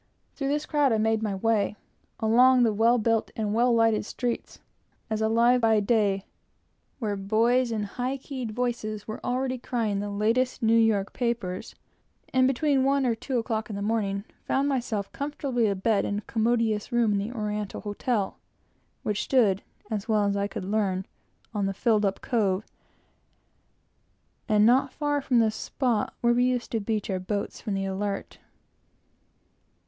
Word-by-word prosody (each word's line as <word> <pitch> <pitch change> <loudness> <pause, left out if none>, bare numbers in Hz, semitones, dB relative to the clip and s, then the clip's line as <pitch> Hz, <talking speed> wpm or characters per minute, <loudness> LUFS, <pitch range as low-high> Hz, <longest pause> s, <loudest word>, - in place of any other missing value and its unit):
Through 275 - -3
this 295 +2 0
crowd 290 -3 +2
I 220 - +3
made 220 0 +1
my 210 -3 -1
way, 210 0 +1 0.4
along 250 +3 +5
the 225 -2 +3
well 230 +3 +4
built 225 -1 +1
and 210 -2 -1
well 240 +2 +3
lighted 225 -2 +3
streets, 240 +3 -4 0.5
as 220 0 -1
alive 230 +3 +4
as - - -3
by 225 -1 +4
day, 200 -2 +1 0.7
where 215 -5 -2
boys 230 +5 +2
in 215 -2 -1
high 250 +6 -3
keyed 260 -3 -6
voices 215 -3 -3
were 215 - -6
already 255 +1 -1
crying 225 -5 -1
the 205 0 -3
latest 230 +5 0
New 225 0 +4
York 220 -3 +2
papers; 235 -7 -3 0.6
and 255 0 +4
between 270 +1 +2
one 275 0 +2
and 230 -2 0
two 260 -3 -1
o'clock 225 -1 -2
in 210 - -4
the 200 - -3
morning 200 -2 -1 0.2
found 275 +1 +1
myself 235 -7 -2
comfortably 275 -5 -1
abed 200 +1 +1
in 205 - -2
a - - -3
commodious 225 -1 0
room, 240 -3 +2
in 200 - +1
the 205 +4 -3
Oriental 210 -1 -3
Hotel, 205 0 -2 0.6
which 210 -1 -1
stood, 210 -7 +3 0.3
as 215 +1 -3
well 215 -1 +3
as 200 0 +1
I 200 0 0
could 190 - -6
learn, 195 -2 0 0.5
on 205 -2 0
the 195 - -3
filled 215 0 +2
up 195 - -3
cove, 210 -4 0 1.8
and 210 0 +5
not 260 +3 +4
far 290 +1 -1
from 260 -2 +1
the 225 -2 +4
spot 230 0 -1
where 240 0 +4
we 245 +1 +3
used 250 -2 -1
to 225 - 0
beach 215 0 -2
our 185 - -1
boats 200 +2 -4
from 210 -4 -3
the 195 0 -1
Alert. 195 +1 -4
225 Hz, 170 wpm, -26 LUFS, 205-245 Hz, 1.8 s, along